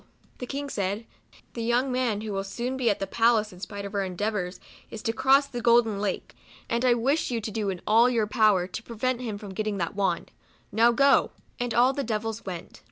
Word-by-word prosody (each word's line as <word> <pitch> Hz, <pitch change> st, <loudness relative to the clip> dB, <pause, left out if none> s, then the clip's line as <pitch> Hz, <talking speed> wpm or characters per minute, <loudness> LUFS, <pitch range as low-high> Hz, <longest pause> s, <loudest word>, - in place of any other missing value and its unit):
The 250 Hz, -, -5 dB
King 285 Hz, +2 st, -4 dB
said, 200 Hz, +3 st, -2 dB, 0.2 s
" -, -, -26 dB
The 235 Hz, -, -5 dB
young 240 Hz, +3 st, +1 dB
man, 245 Hz, -5 st, 0 dB
who 215 Hz, -1 st, -5 dB
will 195 Hz, 0 st, -1 dB
soon 240 Hz, +6 st, -4 dB
be 255 Hz, -3 st, +1 dB
at 205 Hz, -, +1 dB
the 195 Hz, -, -2 dB
palace 220 Hz, 0 st, +2 dB
in 180 Hz, -, -13 dB
spite 200 Hz, +1 st, -6 dB
of 200 Hz, -, -7 dB
our 200 Hz, -1 st, 0 dB
endeavors, 190 Hz, 0 st, -3 dB, 0.3 s
is 220 Hz, -, -8 dB
to 225 Hz, -, 0 dB
cross 270 Hz, +3 st, +4 dB
the 260 Hz, -3 st, -6 dB
6 -, -, -8 dB
Golden 235 Hz, -3 st, +4 dB
Lake; 200 Hz, -2 st, -3 dB, 0.2 s
' -, -, -24 dB
and 235 Hz, +1 st, +1 dB
I 250 Hz, -2 st, +5 dB
wish 275 Hz, +7 st, +1 dB
you 240 Hz, -2 st, -1 dB
to 220 Hz, 0 st, -5 dB
do 205 Hz, -2 st, -1 dB
all 230 Hz, +3 st, +5 dB
in 250 Hz, -, 0 dB
your 220 Hz, -2 st, +2 dB
power 210 Hz, -5 st, +3 dB
to 190 Hz, +4 st, -6 dB
prevent 240 Hz, +2 st, -2 dB
him 220 Hz, -4 st, -4 dB
from 200 Hz, -2 st, -9 dB
getting 215 Hz, +1 st, -2 dB
the 170 Hz, -3 st, -1 dB
wand. 195 Hz, -4 st, -1 dB, 0.4 s
Now 230 Hz, +3 st, +5 dB
go; 275 Hz, +3 st, +4 dB, 0.2 s
" -, -, -32 dB
and 245 Hz, 0 st, -2 dB
all 250 Hz, +3 st, +5 dB
the 280 Hz, -, -2 dB
devils 225 Hz, -1 st, -3 dB
went. 180 Hz, -3 st, -7 dB
225 Hz, 240 wpm, -26 LUFS, 200-245 Hz, 0.4 s, I